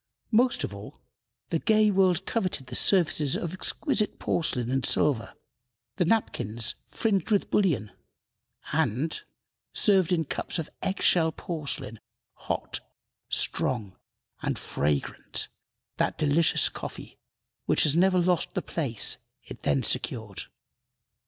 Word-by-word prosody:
Most 245 +3 +3
of 100 - -4
all, 100 +1 -10 0.5
the 165 - +1
gay 215 0 +3
world 185 -3 +2
coveted 185 - -2
the - - -7
services 155 -7 +3
of 170 0 -3
exquisite 215 - +1
porcelain 125 -7 -1
and 135 -1 0
silver, 135 -7 +1 0.6
the 180 - +2
napkins 120 - 0
fringed 200 -5 -1
with 205 -3 +1
bullion, 140 - +1 0.8
and 140 - 0 0.5
served 190 -5 +3
in 165 -3 +1
cups - - -3
of 165 - -5
egg 190 - -2
shell 160 -2 +4
porcelain, 145 - -5 0.3
hot, - - -3 0.5
strong, 110 -8 +1 0.5
and - - -2
fragrant 70 0 -2 0.5
that - - 0
delicious 155 +2 +4
coffee - - -8 0.5
which - - +4
has 150 -1 +4
never 185 +2 +4
lost 175 -1 +1
the - - -1
place 120 -11 +1 0.3
it - - -11
then 70 -2 +1
secured. - - -1
165 Hz, 120 wpm, -27 LUFS, 130-190 Hz, 0.8 s, shell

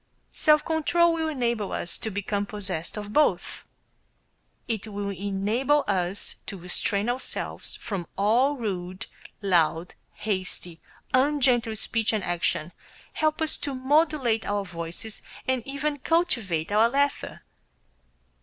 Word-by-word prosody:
Self 305 -1 +4
control 335 +1 +3
will 320 -1 -1
enable 235 -8 -1
us 170 - -1
to 220 - -2
become 205 0 -2
possessed 190 -4 -3
of 210 0 -6
both. 300 0 +1 1.0
It 225 -2 -3
will 200 -1 -3
enable 205 +9 +1
us 190 0 -1
to 200 - -5
restrain 200 +4 +1
ourselves 245 +2 0
from 195 -7 -5
all 240 +8 +3
rude, 185 -5 -4 0.4
loud, 170 -2 +2 0.2
hasty, 185 -5 -3 0.3
ungentle 255 -4 +3
speech 225 +1 0
and 210 -3 0
action, 170 -1 -1 0.4
help 310 +1 +1
us 315 - 0
to 280 -2 -2
modulate 265 -4 +2
our 205 -1 -1
voices, 170 +4 -5 0.3
and 260 -1 +1
even 290 +1 -2
cultivate 235 - +1
our 220 +3 +5
laughter. 280 +2 -1
220 Hz, 120 wpm, -26 LUFS, 195-275 Hz, 1.0 s, our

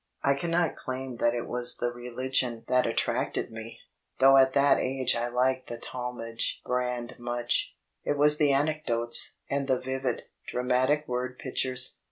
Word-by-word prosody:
I 140 - +4
cannot 165 +3 0
claim 130 -1 -6
that 120 0 +1
it 120 - -3
was 125 0 +3
the 120 - -1
religion 120 -1 -2
that 125 -1 +2
attracted 115 - -1
me, 115 0 -9 0.4
though 135 +1 +6
at 130 0 +5
that 140 0 +4
age 130 -1 0
I 120 +1 -1
liked 130 +1 0
the 120 - -6
Talmage 120 -2 -4
brand 125 -1 -3
much; 120 0 -1 0.3
it 145 - -1
was 150 +1 +5
the 145 -2 +4
anecdotes 135 -5 +3
and 140 0 -2
the 130 -2 +2
vivid, 130 -1 -3 0.2
dramatic 130 +4 +1
word 125 +1 -3
pictures. 130 -1 -1
125 Hz, 155 wpm, -28 LUFS, 120-135 Hz, 0.4 s, though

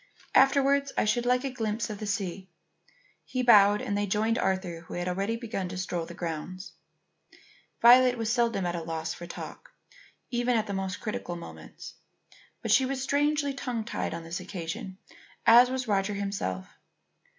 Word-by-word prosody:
Afterwards, 275 +1 +4
I - - +3
should 240 +3 +1
like 250 +1 +2
a 270 - -2
glimpse 220 -2 -2
of 205 - -7
the 215 - -5
sea." 195 -2 -3 0.7
He 255 -1 -3
bowed 205 -3 +6
and 200 - -2
they 205 0 0
joined 220 +4 +1
Arthur 185 -3 -1
who - - -7
had 175 0 -3
already 195 +5 -1
begun 225 -6 -4
to 180 - -6
stroll 180 -2 -2
through 165 - -6
the 170 - -10
grounds. 175 +3 -5 1.1
Violet 250 +1 +7
was 225 0 -1
seldom 235 -6 +1
at 175 - -1
a 170 - -3
loss 160 -1 -4
for 175 - -9
talk - - -9 0.6
even 240 0 +1
at 220 - 0
the 200 - -4
most 190 -1 -3
critical 210 -5 -4
moments. 170 - -10 0.7
But - - -1
she 265 - +6
was 265 -1 -3
strangely 290 +1 +1
tongue 245 -5 -4
tied 215 - -3
on 170 - -7
this 165 +2 -5
occasion, 185 0 -6 0.5
as 240 +2 +8
was 260 -1 -3
Roger 200 0 0
himself. 195 - -3
210 Hz, 175 wpm, -28 LUFS, 185-245 Hz, 1.1 s, as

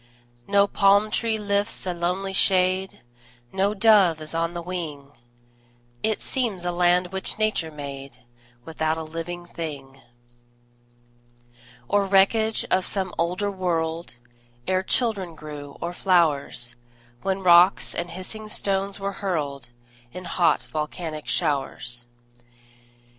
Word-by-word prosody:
No 200 0 +5
palm 200 +1 +3
tree 225 -1 +1
lifts 205 0 -1
a 180 - -1
lonely 180 +3 -2
shade, 185 0 +2 0.5
No 195 +2 +1
dove 200 -6 +5
is 155 0 -6
on 165 +1 -1
the 170 - -3
wing; 155 -6 -6 0.9
It 220 -1 0
seems 220 -9 -1
a 175 - 0
land 175 +1 +2
which 190 +1 0
Nature 215 -7 0
made 140 -3 -8 0.5
Without 160 0 -1
a 160 - -4
living 165 +2 -6
thing, 140 -6 -7 1.9
Or 205 +4 +2
wreckage 215 +3 +3
of 185 0 +3
some 190 -2 0
older 180 +4 0
world, 170 -5 -2 0.5
Ere 185 0 +2
children 195 -5 -1
grew, 150 -2 -9
or 170 +1 -4
flowers, 150 -10 +1 0.5
When 195 0 -2
rocks 175 +1 +6
and 175 0 -3
hissing 185 +5 -6
stones 195 -1 -1
were 200 0 -2
hurled 145 -9 -2 0.4
In 180 +6 -8
hot, 175 -1 +2
volcanic 155 0 -4
showers. 120 -4 -1
180 Hz, 120 wpm, -24 LUFS, 160-195 Hz, 1.9 s, rocks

